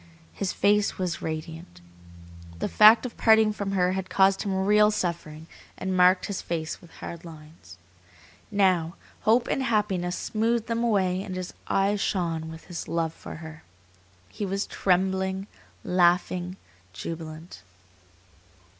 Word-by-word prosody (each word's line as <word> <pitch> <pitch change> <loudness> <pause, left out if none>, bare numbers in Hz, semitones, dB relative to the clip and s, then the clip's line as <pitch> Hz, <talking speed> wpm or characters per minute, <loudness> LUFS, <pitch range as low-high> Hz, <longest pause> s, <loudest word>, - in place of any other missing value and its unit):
His 195 -2 -2
face 205 0 +2
was 180 -2 -3
radiant. 160 - -6 0.8
The - - -2
fact 220 +3 +7
of 245 - -7
parting 220 -1 +5
from 200 -1 -4
her 180 -1 +2
had 190 0 -3
caused 195 0 +3
him 190 -2 -1
real 210 +1 +5
suffering, 170 -6 -3 0.3
had 190 - -4
marked 185 0 +4
his 200 - -4
face 160 -1 -4
with 175 - -16 0.2
hard 170 - -7
lines. 155 - -13 0.7
Now, 185 -5 +2 0.3
hope 235 +2 +4
and - - 0
happiness 200 -7 0
smoothed 225 +1 0
them 230 0 -1
away 190 -5 +1
and 190 -2 -6
his 185 -1 -5
eyes 200 +1 +1
shone 165 -4 -1
with 160 0 -10
his 175 -2 -6
love 165 -1 -1
for - - -9
her. 160 0 -10 0.7
He 95 - -7
was 195 +1 -1
trembling, 190 +1 0 0.4
laughing, 180 0 +1 0.4
jubilant. 160 - -7
185 Hz, 135 wpm, -26 LUFS, 170-205 Hz, 0.8 s, fact